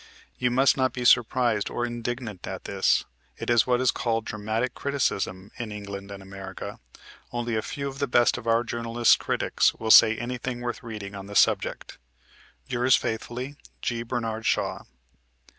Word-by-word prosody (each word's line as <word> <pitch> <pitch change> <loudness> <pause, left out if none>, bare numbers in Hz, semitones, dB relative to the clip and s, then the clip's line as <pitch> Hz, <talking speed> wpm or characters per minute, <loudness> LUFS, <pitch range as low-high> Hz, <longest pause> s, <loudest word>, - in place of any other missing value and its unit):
You 125 - +2
must 130 +3 +4
not 130 -1 +1
be 125 -1 -4
surprised 120 -3 +3
or 120 - -2
indignant 120 -4 -5
at - - -6
this: - - +1 0.3
it - - -2
is 120 0 +4
what 125 -1 +3
is 130 -1 +3
called 115 -2 -1
"dramatic 110 +4 -2
criticism" 100 -9 -2
in 115 -3 -4
England 100 -1 -7
and 100 -1 -8
America. 95 0 -8 0.5
Only 120 -1 -2
a 110 - +1
few 140 +5 -4
of 135 0 -7
the 140 - 0
best 120 -1 +4
of 115 - -10
our 115 +1 +3
journalist 115 0 +2
critics - - +1
will 110 -1 -1
say 110 0 +8
anything 120 +1 -4
worth 120 -1 -4
reading 105 -4 -7
on 100 -1 -8
the 100 - -8
subject. - - +1 0.7
Yours 125 +1 +3
faithfully, 125 +5 -4 0.3
G. 120 -1 -1
BERNARD 115 -2 -3
SHAW. - - 0
120 Hz, 165 wpm, -26 LUFS, 110-125 Hz, 0.7 s, say